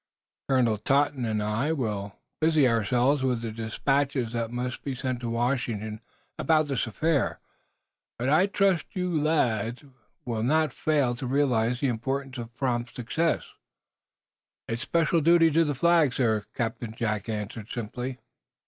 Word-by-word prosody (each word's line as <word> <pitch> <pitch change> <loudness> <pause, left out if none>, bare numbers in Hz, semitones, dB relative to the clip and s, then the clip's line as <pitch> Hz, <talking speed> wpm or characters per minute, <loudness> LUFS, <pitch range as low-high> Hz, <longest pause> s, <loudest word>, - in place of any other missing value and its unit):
"Colonel 120 -5 +2
Totten 140 +1 +1
and 110 -2 -1
I 110 +8 0
will 105 -8 -3 0.2
busy 155 -3 +4
ourselves 125 +5 +2
with 125 -3 0
the 115 - -3
despatches 125 +3 -1
that 115 -1 -1
must 125 +1 -4
be 135 -2 -3
sent 130 -1 -3
to 120 -1 -4
Washington 115 -3 -1 0.4
about 155 -1 +3
this 135 -3 0
affair. 145 +5 0 0.8
But 120 - -2
I 155 +7 +4
trust, 195 -4 +2
lads, 150 - 0
you 140 -2 -19 0.3
will 115 -3 -2
not 155 +6 +2
fail 145 -6 +1
to 130 -1 -4
realize 125 -3 +1
the 140 - +2
importance 130 +2 -3
of 115 0 -7
prompt 120 -2 -2
success." 155 +7 -1 1.1
"It's 115 +1 -3
a - - -4
special 165 0 +2
duty 165 +1 +5
to 165 +3 +4
the 145 -3 -1
Flag, 165 -3 +3
sir," 110 -5 +1
Captain 115 -2 -3
Jack 110 -2 -2
answered, 105 0 -5
simply. 125 +2 -4
125 Hz, 150 wpm, -27 LUFS, 115-145 Hz, 1.1 s, duty